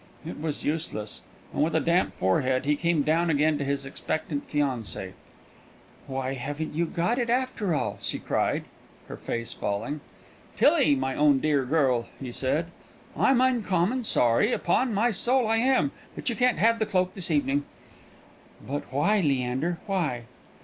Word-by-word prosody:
It 160 - -7
was 155 -2 -3
useless, 150 -9 -3 0.3
and - - -1
with 160 +1 0
a - - +4
damp 170 +3 +1
forehead 130 +8 +1
he 150 +1 +3
came 170 -1 +1
down 165 +3 +2
again 150 0 +2
to - - -1
his 140 0 -2
expectant 145 +1 -4
fiancée. 125 -10 -2 1.0
"Why, 130 -1 -3
you 135 - -5
haven't 155 +4 -3
got 220 +9 +1
it, 240 -1 -1
after 240 -8 0
all!" - - -2
she - - -3
cried, - - 0 0.5
her - - -5
face 115 0 -4
falling. 140 +9 -3 0.5
"Tillie, 145 - +4
my 130 0 -1
own 145 -1 +4
dear 145 -2 +1
girl," 130 -5 +2
he 130 -3 -6
said, 155 +7 -1 0.4
"I'm 265 -2 +3
uncommon 240 -2 +1
sorry, 125 - +3
upon 250 0 +1
my 220 +4 +2
soul 245 +4 +2
I 225 +1 +2
am, 230 - +2 0.2
but - - -3
you 235 - -2
can't 250 0 +2
have 230 +1 +3
that 220 - -1
cloak 185 -1 +1
this 190 -1 -2
evening." 145 -2 +1 1.0
"But 140 -1 -4
why, 205 +11 +2
Leander, 135 +3 0
why?" 165 - -1
155 Hz, 160 wpm, -26 LUFS, 135-195 Hz, 1.0 s, a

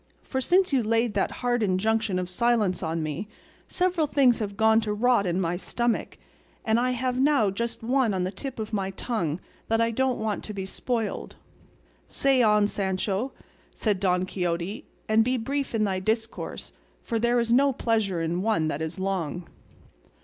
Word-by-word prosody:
For 265 - -2
since 360 +3 +3
you 265 - +4
laid 230 0 +1
that 200 - +1 0.2
hard 245 -1 +2
injunction 210 +1 +1
of 180 -1 -2
silence 210 -1 +1
on 165 -1 -2
me 155 +7 -4 0.4
several 360 -4 +1
things 265 -4 +4
have 200 -2 -4
gone 220 +1 +4
to 215 -1 -2
rot 225 -2 +2
in 175 +1 0
my 175 -1 0
stomach, 235 +5 -2 0.5
and 220 +1 +3
I 250 +1 +1
have 250 0 -1
now 270 -7 +3
just 230 +3 -4
one 250 -1 +2
on 185 -2 -1
the 185 - -2
tip 265 +6 -6
of 220 0 -5
my 195 -2 0
tongue 185 -6 -2 0.3
that 225 0 +1
I 230 0 +2
don't 260 +2 +1
want 220 -1 -2
to 210 - -6
be 190 -1 -3
spoiled." 225 +3 -3 0.7
"Say, 270 -2 +2
on, 210 -2 +4
Sancho," 195 +4 -1 0.4
said 210 -4 0
Don 180 -1 +1
Quixote, 180 +1 -3 0.2
"and 220 +1 +4
be 255 +2 +1
brief 275 +2 -2
in 215 - +2
thy 190 -2 0
discourse, 220 +3 -3 0.3
for 230 - -1
there 240 +1 +2
is 235 0 0
no 275 +3 +5
pleasure 220 -8 0
in 170 +2 -1
one 200 -7 +1
that 150 0 -3
is 160 +3 -4
long." 180 -3 -2
220 Hz, 180 wpm, -26 LUFS, 190-240 Hz, 0.7 s, no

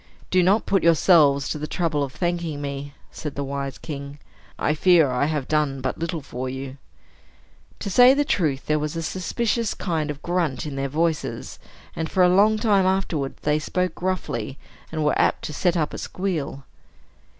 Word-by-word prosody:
"Do 185 - +4
not 195 +5 +3
put 195 -2 +2
yourselves 155 -4 +5
to 150 - -3
the 150 - -4
trouble 155 -3 0
of 135 - -4
thanking 170 -2 -2
me," 140 0 -5 0.2
said 150 -3 -6
the 140 - -2
wise 140 0 -4
king. 140 -2 -7 0.4
"I 150 - +1
fear 160 -3 +4
I 125 +3 +1
have 150 -3 -2
done 150 -3 0
but 130 - -3
little 165 -2 -3
for 130 -1 -5
you." 130 +1 -6 1.0
To - - -4
say 245 +6 +7
the 290 +1 +1
truth, 150 - 0
there 155 0 +1
was 150 +2 -3
a 165 - -3
suspicious 220 +6 -1
kind 160 -5 -2
of 150 - -3
a - - -25
grunt 170 -6 -1
in 145 -2 -5
their 135 0 -2
voices, 160 +2 -2 0.4
and, 160 -1 -3
for 185 - +3
a 180 - +6
long 215 +2 +5
time 205 -4 +3
afterwards, 175 -7 -1
they 150 0 +2
spoke 180 +4 -1
gruffly, 140 -9 -3 0.3
and 155 -1 -1
were 150 - +2
apt - - +1
to 150 - -5
set 175 +3 +1
up 155 -2 -1
a - - -5
squeal. 165 -8 -3
155 Hz, 190 wpm, -23 LUFS, 140-180 Hz, 1.0 s, say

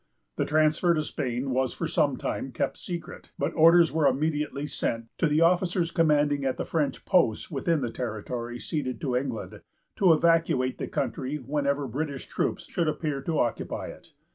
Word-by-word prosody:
This - - -1
transfer 155 +3 +3
to 155 - 0
Spain 130 -2 -3
was 130 -1 0
for - - -3
some - - +1
time - - -3
kept - - -2
secret; 170 -3 -7
but - - -1
orders 165 +1 +6
were 155 -2 +3
immediately 145 +1 0
sent 115 -5 -3
to 165 - +3
the 150 +2 +2
officers 175 0 +2
commanding 150 -3 +2
at 130 -1 -1
the - - -3
French 150 -4 -1
posts 170 - +2
within 155 +2 0
the 120 -3 -2
territory 120 +1 -4
ceded 130 -3 -3
to 130 -4 -1
England, 125 -3 -3 0.4
to 185 -4 +5
evacuate 160 -6 +2
the - - -3
country 140 -2 -2
whenever 140 +1 -1
British 140 +2 -4
troops - - -2
should 170 - -1
appear 150 -2 -2
to 160 +2 -2
occupy 120 - -2
it. - - -12
145 Hz, 170 wpm, -27 LUFS, 130-165 Hz, 0.4 s, orders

